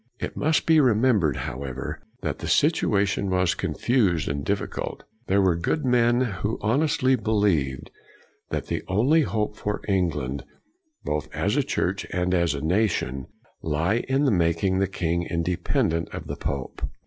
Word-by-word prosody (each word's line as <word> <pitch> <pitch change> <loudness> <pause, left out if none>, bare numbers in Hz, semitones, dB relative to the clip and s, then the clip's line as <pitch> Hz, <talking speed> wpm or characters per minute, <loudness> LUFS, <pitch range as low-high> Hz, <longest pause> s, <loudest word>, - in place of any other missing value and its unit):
It - - -4
must 155 +1 +1
be 160 -1 +5
remembered, 110 - +3
however, 65 0 -5 0.2
that - - -2
the - - -5
situation 100 0 +2
was 90 -1 +2
confused 100 - +1
and 70 0 -2
difficult. 100 +4 -3 0.2
There 100 +1 +3
were 90 -3 +3
good 110 - -1
men 120 -1 +3 0.2
who 105 +2 -1
honestly 130 +2 +2
be 120 - -7
lieved 90 -12 +1 0.6
that - - -2
the - - -2
only 125 +13 +3
hope 105 -6 -1
for 105 0 -3
England, 75 -9 -1 0.6
both 75 -1 -3
as - - 0
a - - +3
church - - -2
and 90 0 0
as 85 -4 +2
a 70 - -4
nation, 80 - 0 0.3
lay 80 +9 0
in 135 -4 +3
making 85 +3 +1
the 95 - +2
king 85 -2 -1
independent 85 -1 0
of - - -6
the - - -5
pope. 70 -2 -4
95 Hz, 150 wpm, -25 LUFS, 80-110 Hz, 0.6 s, be